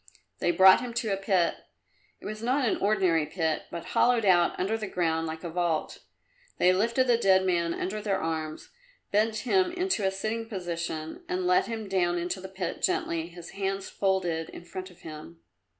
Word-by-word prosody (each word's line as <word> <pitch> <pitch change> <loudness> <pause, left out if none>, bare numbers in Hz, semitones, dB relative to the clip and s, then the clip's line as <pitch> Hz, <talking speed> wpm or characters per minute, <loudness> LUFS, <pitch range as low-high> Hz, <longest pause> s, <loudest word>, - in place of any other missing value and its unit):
They - - +1
brought 190 +4 +7
him 245 -2 -6
to 220 -4 0
a - - +2
pit. 190 -3 +1 0.6
It - - -14
was 215 +1 -5
not 255 +2 +1
an - - +1
ordinary 185 -7 +2
pit, 160 -1 -1
but 170 - -6
hollowed 240 -3 +3
out 175 -3 +4
under 195 +4 0
the 215 -2 -4
ground 165 -3 0
like 160 +1 -6
a 170 - -4
vault. 170 -2 -1 0.6
They 180 +1 +5
lifted 235 +7 +2
the 240 -2 +3
dead 190 -3 +4
man 170 -2 +1
under 210 +3 -3
the 205 -2 -1
arms, 160 -3 -4 0.4
bent 215 +2 +2
him 370 +5 +3
into 365 - 0
a 190 - +3
sitting 220 +4 -3
posture 170 - -4
and 365 0 -1
let 365 +1 +3
him 225 -2 -4
down 175 -2 +1
into 175 +2 -3
the 190 - -8
pit, 190 -2 -4
gently, 170 - 0
his 170 -1 -11
hands 195 0 -3
folded 180 -5 0
in 175 - -11
front 185 +2 -7
of 180 0 -19
him. 150 - -10
190 Hz, 190 wpm, -28 LUFS, 170-220 Hz, 0.6 s, brought